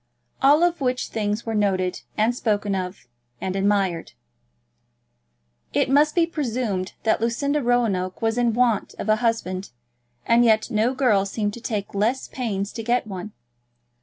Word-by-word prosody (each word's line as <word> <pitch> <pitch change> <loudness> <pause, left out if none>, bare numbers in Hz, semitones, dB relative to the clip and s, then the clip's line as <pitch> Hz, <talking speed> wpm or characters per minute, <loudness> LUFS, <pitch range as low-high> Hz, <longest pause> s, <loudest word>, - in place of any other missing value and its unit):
All 290 +5 +5
of 350 -3 +1
which 255 -1 -1
things 210 0 -2
were 225 - -2
noted, 190 -3 0 0.2
and 220 +3 +3
spoken 210 -4 -1
of, 185 -3 -4 0.3
and 190 0 -3
admired. 195 -4 0 1.6
It - - +1
must 300 +2 +4
be 340 -2 +4
presumed 235 - -2
that 220 -1 +2
Lucinda 280 +6 0
Roanoke 225 -7 0
was 225 0 0
in 240 -2 +1
want 240 -4 +1
of 215 - -4
a 215 - +4
husband, 215 -5 -1 0.6
and 235 +1 +4
yet 220 -2 +3
no 225 +4 +1
girl 215 -7 +3
seemed 205 0 -2
to 235 - -9
take 210 -4 -3
less 220 +6 0
pains 205 -6 -3
to 225 - -5
get 240 +2 +1
one. 200 0 -7
220 Hz, 155 wpm, -23 LUFS, 200-245 Hz, 1.6 s, All